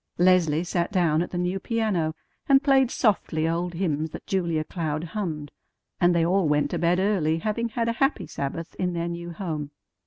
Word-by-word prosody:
Leslie 175 -3 +4
sat 175 +1 -1
down 170 -5 +2
at 175 - -2
the 175 - -4
new 180 +2 -1
piano, 190 -8 -1 0.3
and 270 +1 +6
played 270 -3 +4
softly 175 -10 +1
old 170 +1 -1
hymns 160 -3 -1
that - - -9
Julia 170 -5 0
Cloud 155 -2 -3
hummed; 165 -5 -4 0.5
and 175 0 +4
they 165 -1 +3
all 185 0 +2
went 150 -1 +1
to - - -1
bed 175 +1 +2
early, 185 -5 +1
having 220 +6 -1
had 230 0 -1
a 230 - +1
happy 270 +2 +2
Sabbath 150 +4 -5
in 180 -1 0
their 170 0 -2
new 170 0 -5
home. 160 -5 -4
175 Hz, 190 wpm, -25 LUFS, 160-195 Hz, 0.5 s, and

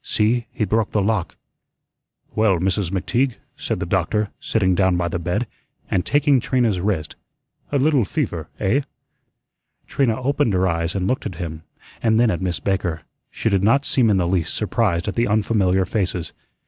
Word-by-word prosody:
See, 115 +2 +1
he 105 - -1
broke 110 +2 0
the 105 - +2
lock." 100 -3 -1 1.0
"Well, 110 -4 +3
Mrs. 95 +1 0
McTeague," 120 +7 0 0.2
said - - -3
the - - -2
doctor, 95 +4 0
sitting 95 -4 +1
down 95 -1 +2
by 85 -1 0
the 90 - -2
bed, 90 +8 -1 0.5
and 90 - +2
taking 145 -2 +3
Trina's 115 -6 +1
wrist, 90 -5 -2 0.6
"a 145 - +2
little 140 -2 +3
fever, 95 - -3
eh?" 125 +9 +2 1.0
Trina 125 -4 0
opened 135 -3 +1
her 95 0 +2
eyes 85 0 -1
and 95 -1 0
looked 130 0 -1
at 95 - -7
him, 80 -2 -6 0.4
and 110 -1 +3
then 120 -1 +4
at 85 - -3
Miss 90 -2 -1
Baker. 90 -5 -1 0.3
She - - -3
did 100 -3 +2
not 135 +8 +3
seem 120 -4 +3
in 100 - +3
the 90 -2 +1
least 85 -3 0
surprised 105 -5 0
at 100 - -1
the 120 - +1
unfamiliar 100 -3 +2
faces. 90 -4 -2
100 Hz, 175 wpm, -21 LUFS, 90-115 Hz, 1.0 s, then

